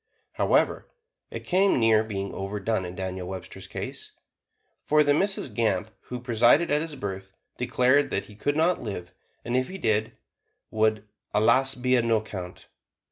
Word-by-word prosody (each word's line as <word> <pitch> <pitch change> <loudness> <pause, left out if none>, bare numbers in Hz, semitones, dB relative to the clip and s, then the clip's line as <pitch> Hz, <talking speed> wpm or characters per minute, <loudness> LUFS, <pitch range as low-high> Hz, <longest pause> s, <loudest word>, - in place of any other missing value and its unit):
However, - - +1 0.4
it - - -6
came 190 -5 +2
near 110 -1 +4
being 100 -3 -4
overdone 100 +1 -2
in 90 +1 -7
Daniel 95 -1 -4
Webster's 95 0 -7
case, - - -7 0.7
for 150 0 +4
the 145 - +2
Mrs. 175 - +1
Gamp 110 -1 0
who 125 - -6
presided 120 +7 +3
at 150 +1 +2
his 160 -2 -5
birth 95 -6 -6 0.3
declared 125 +3 +2
he 100 +2 -3
could 145 +8 -1
not 170 +3 +2
live, 95 -5 -6 0.3
and 120 - -1
if 130 0 +1
he 190 - -6
did, 110 - 0 0.6
would 110 -1 +1 0.3
"allus 130 +5 +4
be 125 0 +1
a - - +3
no 115 -1 +2
'count." 95 -4 -8
115 Hz, 155 wpm, -26 LUFS, 100-135 Hz, 0.7 s, near